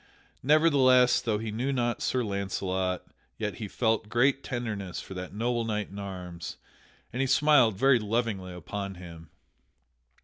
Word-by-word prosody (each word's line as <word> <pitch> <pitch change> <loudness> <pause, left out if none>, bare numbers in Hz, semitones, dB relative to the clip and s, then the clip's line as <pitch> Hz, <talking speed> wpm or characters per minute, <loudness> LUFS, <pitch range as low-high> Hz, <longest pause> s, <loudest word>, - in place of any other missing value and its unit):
Nevertheless, 135 -4 +5
though 110 -3 0
he 110 0 -4
knew 125 +6 -1
not 120 -3 -1
Sir 125 -1 0
Launcelot, 95 -2 -2 0.3
yet 105 -2 -3
he 105 - -5
felt 110 0 0
great 135 +4 +2
tenderness 110 -8 -4
for - - -8
that 90 0 -6
noble 120 +3 -1
knight 105 -3 -2
in 100 - -7
arms, 90 -4 -7 0.6
and 125 - -1
he 135 - +1
smiled 130 -7 +4
very 135 +2 +5
lovingly 105 -4 -2
upon 100 +3 -5
him. 85 -3 -11
110 Hz, 145 wpm, -28 LUFS, 95-125 Hz, 0.6 s, Nevertheless